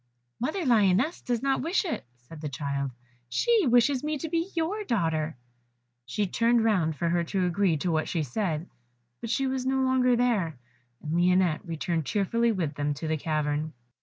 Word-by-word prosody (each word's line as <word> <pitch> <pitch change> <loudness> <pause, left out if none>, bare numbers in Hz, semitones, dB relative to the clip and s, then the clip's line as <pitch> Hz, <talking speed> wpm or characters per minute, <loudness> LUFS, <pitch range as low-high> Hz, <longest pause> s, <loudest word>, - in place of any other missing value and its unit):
"Mother 310 +8 -2
lioness 225 - +3
does 245 -1 -2
not 270 -1 +1
wish 355 +5 0
it," 330 - -4
said 135 +6 -13
the 150 - -3
child, 140 0 -2 0.4
"she 440 - +2
wishes 245 +3 +3
me 300 0 -1
to 320 +3 -5
be 335 +3 -1
your 355 +6 -1
daughter." 160 - 0 0.7
She 205 - 0
turned 230 +4 +2
round 180 -8 +2
for 170 +3 -1
her 170 0 +1
to 185 +2 0
agree 180 -2 +2
to 175 +4 -1
what 155 -1 0
she 165 -3 0
said, 160 - -2 0.5
but 230 - -6
she 270 +4 +1
was 260 -1 -1
no 265 +1 +1
longer 255 -1 +3
there, 215 - +1 0.5
and 155 0 -3
Lionette 180 -2 +3
returned 165 -2 -2
cheerfully 230 +4 +1
with 170 -8 -2
them 145 0 -1
to 160 +3 -5
the 160 - +1
cavern. 155 0 -1
190 Hz, 180 wpm, -27 LUFS, 155-255 Hz, 0.7 s, lioness